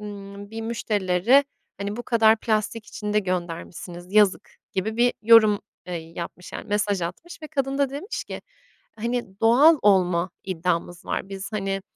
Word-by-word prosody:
ımm, 200 -1 -9
bir 225 0 -6
müşterileri, 225 +2 +2 0.3
hani, 200 +2 -4
"Bu 240 - -4
kadar 225 -2 +4
plastik 215 0 -1
içinde 210 0 -2
göndermişsiniz, 175 -1 -5
yazık!" 210 -3 +4 0.2
gibi 215 +4 -2
bir 245 +1 +4
yorum, 215 -2 +6 0.3
eee, 180 - -4 0.2
yapmış, 175 +1 -7
yani, - - -7
mesaj 205 -2 0
atmış 320 - -7
ve 310 - -5
kadın 275 -2 -1
da 280 -2 +2
demiş 295 - -5
ki, - - -7 0.6
hani, 230 -3 -3
"Doğal 275 +8 +6
olma 180 -3 +3
iddiamız 175 -1 -2
var. - - -3
Biz, 195 +2 -7
hani, 195 -2 -2
205 Hz, 150 wpm, -24 LUFS, 185-230 Hz, 0.6 s, yorum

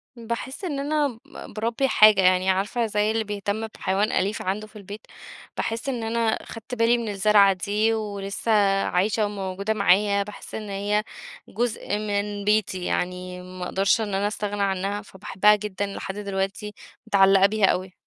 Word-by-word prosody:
باحس 235 - -6
إن 300 -7 -2
أنا 295 +1 +1 0.2
ب - - -11
باربّي 230 +5 0
حاجة، 215 -5 +6
يعني 185 0 +3
عارفة، 200 +5 0
زي 210 0 0
اللي 225 0 0
بيهتم 205 +1 -3
بحيوان 205 0 -1
أليف 200 +3 0
عَنده 200 +3 -3
في 215 - -24
البيت، 205 +1 -9 0.6
باحس 225 +4 -2
إن 245 -4 -3
أنا 225 0 0
خَدْت 225 +3 -8
بالي 230 +1 +3
من 230 -2 -4
الزّرعة 200 0 +4
دي 210 +4 0
ولسّه 205 0 -3 0.3
عايشة 210 +4 +1
وموجودة 200 0 -3
معايا، 200 0 +3
باحس 210 +1 -10
إن 215 -2 -6
هي 205 +2 0 0.5
جزء 220 -2 -2
من 205 -1 -3
بيتي 205 -3 +1
يعني، 180 0 -3
ما 185 0 -7
أقدرش 195 +4 +1
إن 205 -2 -3
أنا 195 +1 +1
أستغنى 205 -1 -3
عنّها 195 +1 -1
فباحبها 200 +1 +2
جدًا 205 -1 -4
لحد 195 -1 -6
دلوقتي، 200 0 -3 0.3
متعلَّقة 195 -1 +5
بيها 210 0 +3
أوي. 185 0 0
205 Hz, 160 wpm, -24 LUFS, 195-220 Hz, 0.6 s, حاجة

